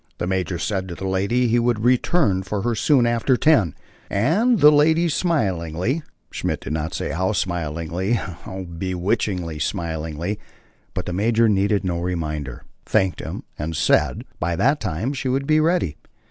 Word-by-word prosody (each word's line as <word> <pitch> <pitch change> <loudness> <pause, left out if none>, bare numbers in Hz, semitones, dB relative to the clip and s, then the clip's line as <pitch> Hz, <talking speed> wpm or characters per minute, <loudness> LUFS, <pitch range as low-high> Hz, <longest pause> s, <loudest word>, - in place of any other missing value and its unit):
The - - -2
major 95 -1 -1
said 95 +1 -2
to 85 - -6
the 95 - -6
lady 100 +6 +1
he 120 +1 +3
would 120 -2 +1
return 120 - +2
for 100 +1 -3
her 120 0 +1
soon 125 +2 +3
after 120 +2 +2
ten, 120 - +3 0.3
and 190 - +2
the 150 0 +8
lady 160 +3 +4
smilingly 110 - 0 0.3
(Schmidt - - -2
did - - -4
not 80 +1 -3
say - - -3
how 95 +6 0
smilingly, 85 +2 -2
how 95 -2 -4
bewitchingly 90 -1 -2
smilingly, 80 +3 -3 0.6
but - - -3
the 90 - -3
major 115 +4 +3
needed 100 0 +2
no 90 -2 -1
reminder) 75 -7 -3 0.2
thanked 95 -5 +1
him, - - -6 0.2
and 80 +2 -3
said, 70 - +2 0.2
by 85 +2 0
that 140 - +2
time 110 - -2
she 135 -1 -3
would 135 +2 0
be 155 +1 +3
ready. 155 - +1
95 Hz, 160 wpm, -22 LUFS, 85-120 Hz, 0.6 s, the